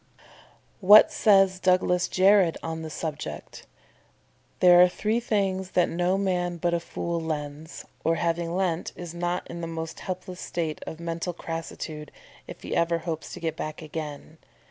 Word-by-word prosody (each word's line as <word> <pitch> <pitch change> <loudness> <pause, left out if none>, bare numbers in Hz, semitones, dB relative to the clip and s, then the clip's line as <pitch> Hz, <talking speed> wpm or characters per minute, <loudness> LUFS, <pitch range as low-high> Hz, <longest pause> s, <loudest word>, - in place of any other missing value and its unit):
'What 205 +2 +8
says 195 -3 +4
Douglas 180 -1 +2
Jerrold 190 -2 +4
on 160 0 -4
the 160 - -6
subject? 150 - -6 0.9
"There 175 -1 +7
are 180 - +7
three 215 +5 -1
things 195 -5 -1
that 180 - +4
no 180 +2 +1
man 180 -3 -1
but 170 +1 0
a 170 - +2
fool 170 0 -4
lends, 155 0 -5 0.2
or, 165 +1 +2
having 170 0 -1
lent, 180 -3 -1
is 175 -2 -8
not 175 +1 -2
in 170 0 -7
the 165 - -4
most 165 -1 -6
helpless 185 -1 -6
state 160 -3 -3
of 160 - -7
mental 170 +1 -3
crassitude 160 -2 -6 0.4
if - - -10
he - - -3
ever 170 0 +2
hopes 160 -1 -5
to - - -8
get 160 -2 -2
back 155 +1 -6
again. 155 0 -7
170 Hz, 160 wpm, -26 LUFS, 160-185 Hz, 0.9 s, What